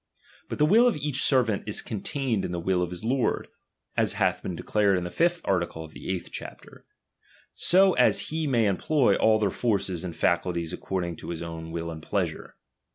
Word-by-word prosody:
But - - -4
the 150 - +4
will 225 +9 +6
of 240 - +1
each 145 -2 -1
servant 120 -7 +2
is 105 - -2
contained 115 0 -2
in - - -3
the 90 - -2
will 90 +1 0
of 90 - -1
his 90 +1 -7
lord 125 +2 0
j - - -30 0.5
as - - +2
hath - - +1
been 90 - -4
declared 100 +2 +1
in 90 - -2
the 90 - -5
fifth 170 - +1
article 85 -4 -1
of 80 - -14
the - - -8
eighth 95 -2 -3
chapter; - - -10 0.7
so 190 +1 +4
as - - +2
he 160 0 -2
may 120 -5 +2
employ 135 - +2
all 110 0 +4
their 105 -3 0
forces 95 -7 -1
and 85 -3 -5
facilities 85 -1 0
according 85 -3 -3
to - - -9
his 85 -1 -4
own 80 -1 -7
will 85 0 -4
and 80 -1 -8
pleasure. - - -3
100 Hz, 205 wpm, -26 LUFS, 85-135 Hz, 0.7 s, will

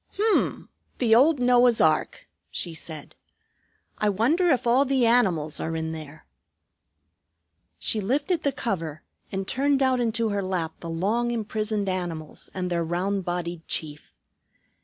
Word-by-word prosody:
"H'm! 430 +1 +1 0.3
The 230 -3 +3
old 280 +5 +5
Noah's 245 -1 +4
ark," 155 -1 +1 0.2
she 170 - -4
said. 155 -2 -7 0.9
"I 210 - +2
wonder 300 - +2
if 260 -4 +2
all 245 +3 +4
the 265 -3 +2
animals 185 -11 +2
are 165 0 -3
in 160 0 -2
there." 155 -1 -9 1.5
She 210 - 0
lifted 285 - 0
the 285 - +1
cover, 170 - -3 0.3
and 195 0 -3
turned 275 +1 +2
out 260 -1 +2
into 230 -1 0
her 200 -1 -1
lap 180 -4 -2
the 170 - -7
long 210 +9 0
imprisoned 215 -2 -2
animals 175 -5 -4
and 180 -1 -3
their 170 -1 +1
round 185 +3 -1
bodied 175 -1 -4
chief. 150 -2 -4
205 Hz, 140 wpm, -25 LUFS, 170-245 Hz, 1.5 s, old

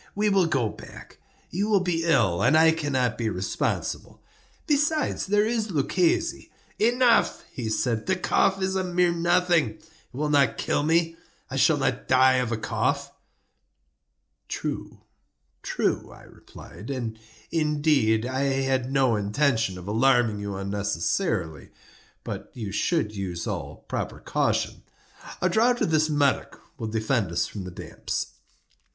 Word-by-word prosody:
We 210 +1 +2
will 195 -4 +3
go 135 -8 +1
back; - - -12 0.3
you 200 +5 -1
will 205 -2 +4
be 175 -3 -1
ill, 115 - +3
and 155 - +4
I 160 0 +6
cannot 140 -7 -1
be 115 -2 0
responsible. 95 -1 -3 0.5
Besides, 300 -3 +1
there 205 +2 +3
is 225 -1 -1
Luchesi—" 165 +2 0 0.3
"Enough," 240 +1 +3
he 115 -4 -4
said; 110 0 -1
"the 190 - +2
cough 190 +1 +2
is 190 0 0
a 190 - 0
mere 180 -1 +2
nothing; 170 -7 +2
it - - -23 0.2
will 150 +4 -2
not 135 -6 +3
kill - - 0
me. 165 +2 +1 0.3
I - - -3
shall - - +4
not - - -1
die 130 0 +5
of 125 -2 -1
a 115 - 0
cough." - - -1 1.4
"True—true," 65 0 -5
I - - -14
replied; 95 +9 -13
"and, 120 -5 -4 0.3
indeed, 150 -8 +2
I 130 +1 -2
had 135 -1 0
no 135 -4 +3
intention 110 -1 0
of 90 +1 -10
alarming 115 -1 +3
you 100 -1 -4
unnecessarily—but 95 -6 -4
you 110 -5 -5
should 110 - 0
use 90 -4 -4
all - - -5
proper - - -3
caution. - - -1 0.6
A - - +5
draught 235 +6 +2
of - - +1
this 155 0 +3
Medoc 145 -2 +1 0.2
will 115 - -3
defend 110 -3 0
us 85 - 0
from 100 -3 -7
the - - -6
damps." 90 - -5
135 Hz, 140 wpm, -25 LUFS, 110-170 Hz, 1.4 s, I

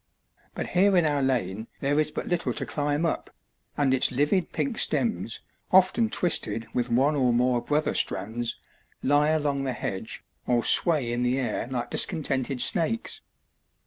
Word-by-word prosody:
But - - -4
here 190 +1 +3
in 175 - +3
our 145 -2 +1
lane 110 -5 -1
there 145 +2 +1
is 155 - +1
but - - -6
little 165 -8 -1
to - - -4
climb 145 +2 -1
up, 165 - -2 0.5
and 140 -2 +2
its 130 - +4
livid 150 +7 +1
pink 255 -5 -2
stems, 220 - 0 0.3
often 190 +5 +4
twisted 115 - 0
with 125 0 -1
one 135 +6 +2
or 130 -3 +2
more 120 0 +2
brother 150 +4 0
strands, 115 +3 -1 0.5
lie 145 +2 +3
along 145 -3 0
the 135 -2 -2
hedge 105 -2 -5 0.2
or 120 -2 +2
sway 145 -9 +3
in 120 - -1
the 125 +1 +1
air 125 -3 -2
like 120 -2 -4
discontented 140 -7 +1
snakes. 225 - 0
140 Hz, 160 wpm, -26 LUFS, 120-160 Hz, 0.5 s, its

